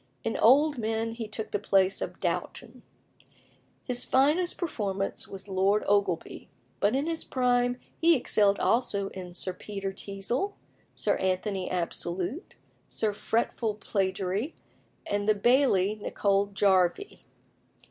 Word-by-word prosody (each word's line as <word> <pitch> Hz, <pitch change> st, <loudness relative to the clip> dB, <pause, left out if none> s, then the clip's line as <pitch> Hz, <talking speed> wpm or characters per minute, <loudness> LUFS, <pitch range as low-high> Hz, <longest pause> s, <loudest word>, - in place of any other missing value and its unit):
In 225 Hz, -, -2 dB
old 285 Hz, +4 st, +5 dB
men 225 Hz, 0 st, -1 dB
he 225 Hz, -1 st, -5 dB
took 215 Hz, +1 st, -6 dB
the 205 Hz, -, 0 dB
place 195 Hz, -1 st, +2 dB
of -, -, -5 dB
Dowton. -, -, -4 dB, 1.0 s
His 245 Hz, -1 st, -1 dB
finest 300 Hz, +7 st, +2 dB
performance 200 Hz, -, -3 dB
was 195 Hz, 0 st, -9 dB
Lord 195 Hz, +2 st, +2 dB
Ogleby, 200 Hz, -4 st, 0 dB, 0.3 s
but 205 Hz, +4 st, +2 dB
in 275 Hz, +2 st, 0 dB
his 330 Hz, 0 st, -2 dB
prime 245 Hz, -1 st, +1 dB, 0.2 s
he 335 Hz, 0 st, +5 dB
excelled 205 Hz, -6 st, +3 dB
also 200 Hz, -5 st, +1 dB
in 180 Hz, -2 st, -9 dB
Sir 185 Hz, 0 st, -1 dB
Peter 195 Hz, +1 st, -5 dB
Teazle, 200 Hz, -, -3 dB, 0.4 s
Sir -, -, +1 dB
Anthony 190 Hz, +1 st, -1 dB
Absolute, 180 Hz, -, -3 dB, 0.3 s
Sir 215 Hz, -2 st, -1 dB
Fretful 225 Hz, +1 st, -1 dB
Plagiary, 195 Hz, -, -2 dB, 0.5 s
and 205 Hz, +1 st, -1 dB
the 215 Hz, -, +5 dB
Bailie 210 Hz, -3 st, +3 dB
Nicol 200 Hz, -1 st, +1 dB
Jarvie. 195 Hz, -, +1 dB
205 Hz, 125 wpm, -28 LUFS, 195-245 Hz, 1.0 s, old